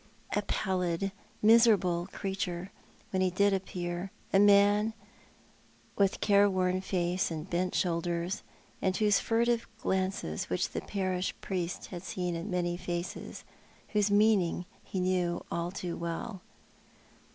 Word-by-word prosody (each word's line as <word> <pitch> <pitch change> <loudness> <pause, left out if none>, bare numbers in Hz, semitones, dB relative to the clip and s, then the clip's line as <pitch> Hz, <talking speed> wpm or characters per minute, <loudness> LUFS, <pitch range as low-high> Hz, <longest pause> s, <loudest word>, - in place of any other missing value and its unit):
A - - +2
pallid, 185 -1 -1 0.3
miserable 215 -6 +5
looking 175 +3 -8
creature 190 -2 -3 0.4
when 190 - +1
he 185 - +3
did 200 +2 +3
appear; 180 -1 -3 0.2
a 195 - +6
man 205 +2 +5 1.0
with 195 -1 +2
careworn 185 -3 +3
face 180 -1 0
and 160 +1 -5
bent 180 0 -1
shoulders, 170 +1 -1 0.4
and 185 0 +1
those 210 -1 +3
furtive 235 +1 +1
glances 185 - -1
which 90 - 0
the - - -4
parish 185 -2 -2
priest 180 -2 -3
had 175 -2 -5
seen 180 -1 -3
in 165 +5 -4
many 175 -1 0
faces, 175 -1 -5 0.5
whose 210 -1 +2
meaning 205 -4 +3 0.2
he 190 - -4
knew 180 -1 0
only 170 +1 -2
too 180 -3 -4
well. 170 +4 -4
185 Hz, 130 wpm, -30 LUFS, 175-200 Hz, 1.0 s, a